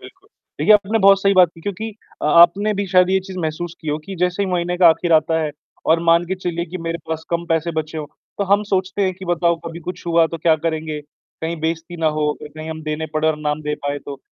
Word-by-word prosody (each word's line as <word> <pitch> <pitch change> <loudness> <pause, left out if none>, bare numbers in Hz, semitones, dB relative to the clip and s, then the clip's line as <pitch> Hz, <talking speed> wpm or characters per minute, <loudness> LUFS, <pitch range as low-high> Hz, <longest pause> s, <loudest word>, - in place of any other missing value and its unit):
बिल्कुल। 380 +2 -16 0.3
देखिए 215 - +5
आपने 205 -1 +1
ना 225 - +4
बहुत 195 -1 +6
सही 195 0 +3
बात 180 -2 +6
की 165 - -14
क्योंकि 205 +4 -4 0.3
अ, - - -1
आपने 175 +7 +5
भी 200 0 -2
शायद 185 0 +4
ये 190 - +4
चीज़ 190 -1 -8
महसूस 165 +1 -3
की 160 - -7
हो 150 - 0
कि 195 - -7
जैसे 180 +2 +1
ही 195 - -1
महीने 175 0 -1
का 175 -2 +8
आखिर 170 +1 +2
आता 160 +1 +3
है, 155 -1 -1 0.4
और 165 +1 +4
मान 170 +1 +4
के 190 - -1
चलिए 175 -2 -3
कि 185 - -5
मेरे 165 0 -2
पास 160 0 -3
कम 170 0 -1
पैसे 165 +1 +1
बचे 160 0 -3
हो, 155 - -4 0.3
तो 200 - +1
हम 200 +2 +3
सोचते 190 +1 0
हैं 185 - +1
कि 190 +1 -10
बताओ 170 -1 +1
कभी 165 +1 -7
कुछ 180 +1 -7
हुआ 165 -1 +4
तो 165 0 -6
क्या 160 0 +4
करेंगे, 155 -2 -2 0.4
कहीं 165 +1 -3
बेइज्जती 165 +2 -3
ना 160 - +2
हो 150 - +1
अगर 150 - -11
कहीं 155 - -6
हम 160 0 -6
देने 155 +1 -3
पड़ 155 0 0
और 155 -1 +2
ना 150 -1 -1
हम 150 +1 -3
दे 150 0 -2
पाएँ 145 0 -2
तो। 140 -1 -6
170 Hz, 270 wpm, -20 LUFS, 160-185 Hz, 0.4 s, का